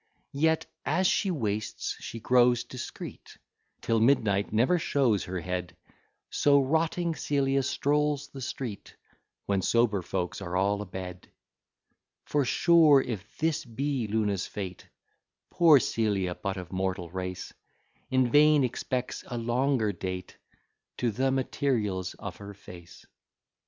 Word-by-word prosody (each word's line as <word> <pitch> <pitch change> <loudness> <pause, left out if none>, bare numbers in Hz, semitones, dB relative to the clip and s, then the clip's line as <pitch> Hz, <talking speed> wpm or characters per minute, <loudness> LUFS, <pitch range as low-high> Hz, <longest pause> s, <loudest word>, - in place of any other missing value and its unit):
Yet, 160 +3 +2 0.2
as 185 - +1
she 195 +2 +2
wastes, 110 - -2
she 115 - -7
grows 120 +1 +4
discreet, 120 0 -9 0.4
Till 115 -1 +1
midnight 110 -5 +2
never 125 +12 +3
shows 125 - +1
her 90 0 -4
head; 90 -1 -4 0.5
So 140 -1 +4
rotting 165 +5 0
Celia 140 -3 +1
strolls 145 +1 0
the 135 - -9
street, 120 -4 -6 0.5
When 100 -1 +1
sober 110 -1 +2
folks 90 +2 -3
are 90 -1 -3
all 100 +2 +1
a 105 - -6
bed: 90 0 -8 0.9
For 145 -2 +1
sure, 160 0 +5
if 110 -6 -5
this 160 -1 0
be 130 0 -2
Luna's 105 -2 0
fate, 95 -3 -7 0.6
Poor 160 -5 +6
Celia, 100 -6 0
but 95 +1 -4
of 90 -1 -8
mortal 95 -2 -2
race, 90 0 -5 0.6
In 130 -2 +2
vain 150 -1 +6
expects 125 +1 -3
a 120 - -4
longer 120 -1 +1
date 95 0 -6 0.6
To 120 -2 0
the 130 +5 0
materials 120 -8 -1
of 100 -4 -7
her 100 0 -10
face. 85 -3 -13
115 Hz, 130 wpm, -28 LUFS, 95-140 Hz, 0.9 s, Poor